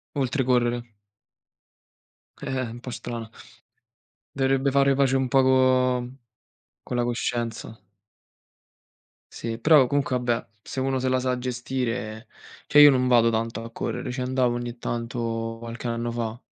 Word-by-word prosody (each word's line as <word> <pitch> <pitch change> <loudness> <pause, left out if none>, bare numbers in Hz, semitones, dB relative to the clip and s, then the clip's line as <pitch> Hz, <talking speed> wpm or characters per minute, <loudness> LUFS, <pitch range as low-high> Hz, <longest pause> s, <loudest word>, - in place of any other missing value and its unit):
Oltre 135 0 0
correre. 120 -1 +1 1.6
Eh-eh, 130 -3 -3
un 120 - -9
po' 125 - -7
strana. 115 -1 -6 1.1
Dovrebbe 135 0 +1
fare 140 0 +3
pace 135 -1 +2
un 135 -1 +1
po' 135 +1 +4
co 130 -1 +3 0.8
co - - -5
la 120 - +1
coscienza. 120 -1 -3 1.6
Sì, 115 -1 -4
però 140 +2 +5
comunque 140 -1 0
vabbè, 120 -1 -1
se 130 - -6
uno 130 0 0
se 130 - 0
la 130 0 +2
sa 125 0 -1
gestire, 125 -2 -3 0.4
cioè 150 - +7
io 145 - +10
non 130 -1 +1
vado 115 -2 +4
tanto 115 0 -2
a 115 - -9
correre, 125 - -4
ci 130 +1 -4
andavo 125 -1 +1
ogni 120 0 -5
tanto 115 -1 -3
qualche 115 +1 -6
anno 115 0 -2
fa, 115 -1 -4
125 Hz, 140 wpm, -25 LUFS, 115-130 Hz, 1.6 s, io